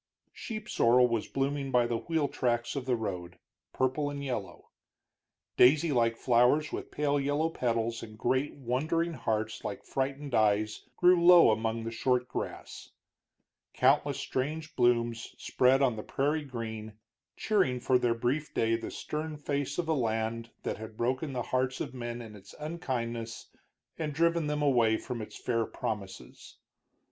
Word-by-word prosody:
Sheep 215 -2 -6
sorrel 125 - +4
was 115 -3 -1
blooming 135 0 -1
by 125 -2 +3
the 120 -1 -1
wheel 160 -1 0
tracks 120 -2 -1
of 135 -2 -4
the 125 - +2
road, 90 -5 -5 0.3
purple 135 +3 0
and 140 0 -5
yellow; 105 -10 -5 0.9
daisy 150 +6 +5
like 115 -3 +2
flowers, 125 +6 +3
with - - -5
pale 145 -1 0
yellow 145 +4 0
petals 115 -4 -1
and 110 -1 -10
great 130 +5 0
wondering 155 +7 -1
hearts 110 -4 -2
like 100 - -5
frightened 135 +1 -3
eyes, 105 -1 +1
grew 175 -1 +5
low 175 -7 +8
among 110 +1 -1
the 115 - -4
short 125 +1 +1
grass; - - -6 0.9
countless 140 +2 +3
strange 155 +5 -3
blooms 120 -1 +1
spread 130 +2 +3
on 125 -4 +2
the - - -3
prairie 150 +2 -1
green, 110 -4 -6 0.4
cheering 190 -13 +1
for 125 +1 +3
their 120 -1 +1
brief 130 +6 -2
day 115 0 +2
the 115 - -5
stern 155 0 -5
face 145 -1 -2
of 175 - -1
a 160 - +2
land 115 -3 -1
that - - -2
had 110 0 -9
broken 130 +5 -1
the 125 -2 -2
hearts 130 0 +1
of - - -4
men 120 -1 -5
in 110 -2 -11
its 100 -1 -14
unkindness 120 -8 -4 0.5
and 155 -2 -2
driven 170 -1 +2
them 150 0 -1
away 120 -6 +3
from 120 -1 -5
its 105 - -8
fair 115 -2 0
promises. 100 -3 -6
125 Hz, 155 wpm, -30 LUFS, 115-145 Hz, 0.9 s, low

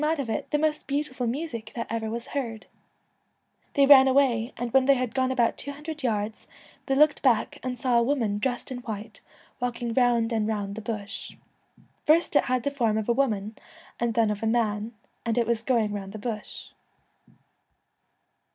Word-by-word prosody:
Twilight, 310 +2 +1
of 245 -5 -2
it - - -3
the 295 - +1
most 305 0 0
beautiful 275 -3 -2
music 235 -4 -4
that 230 - -3
ever 225 -1 -3
was 235 +2 -5
heard/ 235 -6 -4 1.1
They 280 - +6
ran 270 -1 +9
away, 260 -3 +2
and 240 -1 -4
when 265 0 +4
they 275 - +6
had 250 -2 -2
gone 260 -1 +1
about 240 -3 +1
two 285 - -5
hundred 300 +2 -7
yards 215 -3 -2 0.4
they 270 - +1
looked 295 +1 +4
back 245 -5 +2
and 255 -1 -4
saw 245 -1 +2
a - - +3
woman 235 -5 0
dressed 245 +2 -2
in 250 - -4
white, 220 -3 -7 0.4
walking 240 -2 -2
round 240 -2 +2
and 215 -1 0
round 205 -2 -2
the 220 - -6
bush. 215 -2 -6 0.4
' - - -31
First 320 +1 +4
it - - +5
had 250 -1 0
the 285 - 0
form 230 -6 +1
of 220 +1 -2
a - - +5
woman, 220 -5 0 0.4
and 235 -2 0
then 225 -2 +3
of 205 - -4
a 225 - 0
man, 220 -1 0 0.3
and 230 -1 -1
it 235 - +3
was 230 -1 0
going 230 -4 +1
round 195 -1 -6
the - - -5
bush.' 215 0 -6
235 Hz, 195 wpm, -26 LUFS, 220-265 Hz, 1.1 s, ran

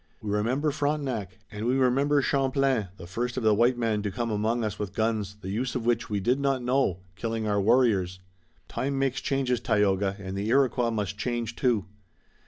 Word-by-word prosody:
We 105 - -4
remember 125 +9 +1
Frontenac, 140 - -2
and 110 +2 -4
we 125 - +2
remember 135 +2 +3
Champlain, 135 -5 +1
the 85 - -9
first 120 +8 -3
of 130 - -1
the 110 -1 +5
white 120 +4 +3
men 110 -3 0
to 105 - -2
come 115 +4 -3
among 110 +3 0
us 105 -3 -3
with 100 -2 -4
guns, 110 -3 -1
the 95 - -5
use 125 +5 -2
of 120 -3 -2
which 115 -1 +1
we 105 -1 0
did 125 +8 +1
not 135 -2 0
know, 125 -8 +1
killing 115 +1 -3
our 100 -1 +1
warriors.'" 100 -5 +2 0.5
"Time 140 +1 -2
makes 135 -1 0
changes, 130 -3 0
Tayoga, 100 -1 +1
and 95 -1 -6
the 100 +2 -2
Iroquois 125 -1 +3
must 105 -3 -3
change 120 -1 -2
too." 120 -7 +1
115 Hz, 190 wpm, -27 LUFS, 105-130 Hz, 0.5 s, the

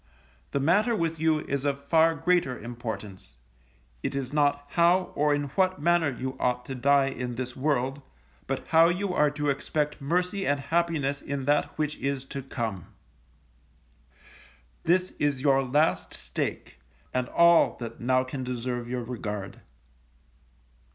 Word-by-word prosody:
The 140 - -1
matter 205 - +3
with 165 -4 -1
you 160 -1 +2
is 140 -2 -3
of 140 -1 -1
far 165 +2 +4
greater 165 -5 +1
importance, 110 - -7 0.7
it - - -3
is 135 0 -3
not 145 -1 +2
how, 175 +4 +3
or 150 +1 +2
in 145 -1 0
what 185 +4 +1
manner 170 0 +3
you 130 0 -4
ought 125 0 0
to 135 - -5
die 135 +2 +3
in 125 -2 -4
this 125 0 -5
world, 135 -1 0 0.5
but 135 0 -3
how 165 +1 +6
you 180 +2 -1
are 150 -4 +3
to 145 0 -1
expect 150 +1 -2
mercy 180 +6 0
and 145 0 +2
happiness 155 -3 0
in 140 -1 -4
that 145 +1 +1
which 150 -1 -1
is 135 -1 -2
to 140 - -3
come. 115 -8 -4 2.0
This 180 +2 +2
is 140 -3 0
your 135 -2 +4
last 145 +5 +1
stake, - - -4 0.3
and 125 -1 -1
all 170 0 +5
that 115 -1 -7
now 130 +1 +2
can 130 0 -5
deserve 120 -1 -3
your 125 -1 -2
regard. 105 -5 -5
140 Hz, 150 wpm, -27 LUFS, 125-160 Hz, 2.0 s, how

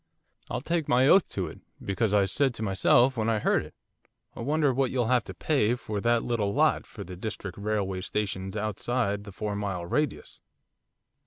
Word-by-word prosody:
'I'll 125 - -2
take 165 +1 -1
my 125 +2 +4
oath 190 +4 +5
to 95 - -2
it, 80 - -9 0.2
because 100 +2 -1
I 100 -1 +4
said 130 +6 +1
to 110 - -4
myself, 120 +6 +4
when 110 0 +1
I 110 - +2
heard 105 - +2
it, - - -13 0.6
"I - - -10
wonder 145 +2 +1
what 130 0 +1
you'll 120 -2 0
have 125 -3 +3
to 95 - -7
pay 125 - +1
for 105 -4 -4
that 120 +1 +2
little 105 -4 -1
lot, - - +2
for - - -8
the 90 +1 -8
District 95 -1 -6
Railway 100 -2 -2
Station's 95 0 -3
outside 105 0 -1
the 100 - -9
four 105 +1 -4
mile 100 -4 -3
radius." 150 - -2
110 Hz, 190 wpm, -27 LUFS, 100-125 Hz, 0.6 s, oath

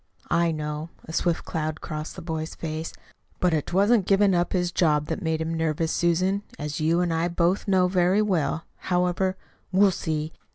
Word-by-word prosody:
"I 170 0 +3
know." 150 0 -4 0.2
A 160 - -8
swift 170 0 0
cloud 155 -1 -3
crossed 155 -1 -6
the 180 - -8
boy's 160 -1 -4
face. 160 0 -4 0.5
"But 180 - +2 0.2
'twasn't 200 +2 +3
giving 195 0 +4
up 175 0 +1
his 180 -2 0
job 150 -4 +2
that's 180 - -3
made 160 -2 -1
him 160 +1 -2
nervous, 160 0 0
Susan, 185 +4 +1 0.2
as 150 0 -4
you 165 +3 +2
and 175 -2 0
I 165 +1 +1
both 175 +4 0
know 185 -2 +4
very 185 +3 +3
well. 165 -5 0
However, 180 +1 0 0.3
we'll 195 +1 +5
see. 155 -2 -3
170 Hz, 175 wpm, -25 LUFS, 160-185 Hz, 0.5 s, we'll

